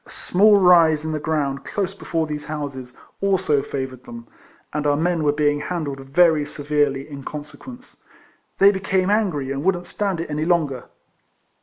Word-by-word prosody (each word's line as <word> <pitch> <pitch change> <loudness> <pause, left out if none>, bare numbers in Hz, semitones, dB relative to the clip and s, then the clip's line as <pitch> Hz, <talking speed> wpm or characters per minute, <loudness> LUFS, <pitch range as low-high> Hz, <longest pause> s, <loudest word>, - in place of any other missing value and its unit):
A - - -20
small 205 +3 +4
rise 165 -4 +5
in 160 - -2
the 155 - -2
ground 145 -3 -2
close 195 -2 -3
before 165 -4 -2
these 150 -1 -5
houses, 140 -5 -6 0.3
also 185 -7 +2
favoured 130 -2 -6
them; 115 0 -10 0.5
and 150 0 -1
our 145 0 +2
men 165 0 0
were 145 - +3
being 145 0 +1
handled 145 -4 -4
very 150 +3 +3
severely 145 -2 -1
in 140 -2 -9
consequence. 155 - -10 0.6
They 200 +1 +6
became 190 -1 0
angry, 175 -11 0
and 140 +1 -3
wouldn't 180 -1 0
stand 195 -2 -2
it 165 - -5
any 150 +1 -1
longer. 155 -7 0
155 Hz, 165 wpm, -21 LUFS, 145-180 Hz, 0.6 s, They